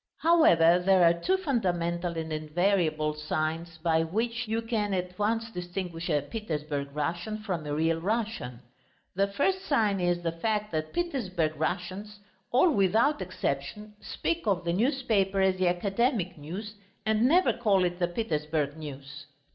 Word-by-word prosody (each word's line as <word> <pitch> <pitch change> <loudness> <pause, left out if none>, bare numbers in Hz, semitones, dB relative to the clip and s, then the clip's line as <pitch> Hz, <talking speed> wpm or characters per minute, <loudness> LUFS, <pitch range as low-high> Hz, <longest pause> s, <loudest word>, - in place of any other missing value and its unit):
However, 180 - +5
there 190 -1 +5
are 170 0 +6
two 365 - 0
fundamental 175 - -1
and 160 -1 -3
invariable 155 -1 +1
signs 155 +2 -3
by 160 0 +2
which 230 +8 -2
you 225 +1 -1
can 215 -4 -1
at 180 +1 -4
once 225 +2 0
distinguish 175 -2 -5
a 145 -3 +1
Petersburg 150 -6 -4
Russian 170 +8 -2
from 175 -7 -3
a 145 - -2
real 165 +1 +1
Russian. 205 - -2 0.5
The 195 +2 +2
first 370 - 0
sign 215 -8 +1
is 175 -1 0
the 165 - 0
fact 210 +5 -2
that 155 -1 -2
Petersburg 195 - -1
Russians, 185 +6 -3 0.3
all 290 +8 +4
without 220 +4 +2
exception, 185 +3 -4
speak 340 -5 -3
of 185 -3 +1
the 170 0 -1
newspaper 215 - +1
as 190 -1 +3
the 185 -1 +2
Academic 195 - 0
News 185 +8 -7 0.3
and 220 +2 +3
never 355 +6 +4
call 205 -6 +2
it 175 0 -1
the 175 - +2
Petersburg 155 -6 -2
News. 145 -1 -9
180 Hz, 150 wpm, -28 LUFS, 165-215 Hz, 0.5 s, are